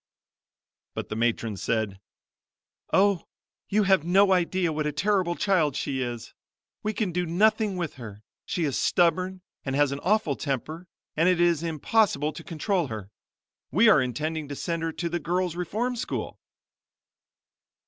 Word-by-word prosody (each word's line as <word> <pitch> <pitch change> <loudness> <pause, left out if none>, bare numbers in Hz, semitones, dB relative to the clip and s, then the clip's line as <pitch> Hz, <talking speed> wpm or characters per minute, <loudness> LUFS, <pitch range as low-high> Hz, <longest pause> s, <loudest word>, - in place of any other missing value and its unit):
But - - -5
the - - -3
matron 115 -2 0
said 105 -2 -1 0.9
"Oh, 200 -2 +3 0.4
you 210 +1 +3
have 190 -5 +4
no 190 +3 +4
idea 180 -1 +1
what 155 0 -1
a - - 0
terrible 185 +2 +1
child 170 -9 +2
she 135 -2 -2
is! 120 -2 -5 0.5
We 215 - -1
can 210 -3 -1
do 180 +1 0
nothing 210 +3 +2
with 170 -5 -4
her, 105 -2 -9 0.2
she 175 - -2
is 145 -4 0
stubborn 185 +2 +2 0.2
and 135 -1 -2
has 145 -1 +3
an 140 - -3
awful 185 -5 +1
temper 155 +6 -4 0.3
and 165 +4 +4
it 180 -2 +2
is 170 -3 +3
impossible 160 -1 +1
to - - -9
control 175 0 -1
her. 105 -4 -7 0.6
We 210 - +5
are 150 - +6
intending 155 +4 -2
to 145 - -5
send 165 +3 -3
her 165 0 -1
to 170 +2 -3
the 175 +1 -2
Girl's 175 +1 -1
Reform 220 +8 -2
School." 235 - -4
170 Hz, 160 wpm, -26 LUFS, 145-190 Hz, 0.9 s, are